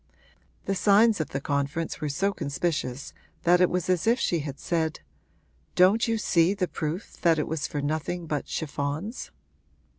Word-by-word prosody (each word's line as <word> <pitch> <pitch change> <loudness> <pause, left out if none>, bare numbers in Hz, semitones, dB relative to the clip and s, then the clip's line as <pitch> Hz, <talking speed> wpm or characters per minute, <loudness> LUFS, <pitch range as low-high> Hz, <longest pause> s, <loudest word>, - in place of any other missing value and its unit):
The 195 - 0
signs 205 +1 +4
of 155 - -3
the 135 - -3
conference 140 +3 -2
were 150 - -1
so 195 +8 0
conspicuous 145 -4 -3 0.3
that 180 +1 +5
it 180 - +5
was 180 -1 -1
as 185 +1 +1
if 235 +3 +4
she 170 - +1
had 145 -2 -6
said, 160 -2 -1 0.7
'Don't 200 +6 +5
you 225 0 +1
see 185 -2 +2
the 185 -2 0
proof 165 +6 -5
that 170 -5 +4
it 150 - -1
was 160 -2 -2
for 145 -1 -4
nothing 160 +4 -2
but 150 -2 -3
chiffons?' 155 - -4
165 Hz, 170 wpm, -27 LUFS, 150-185 Hz, 0.7 s, that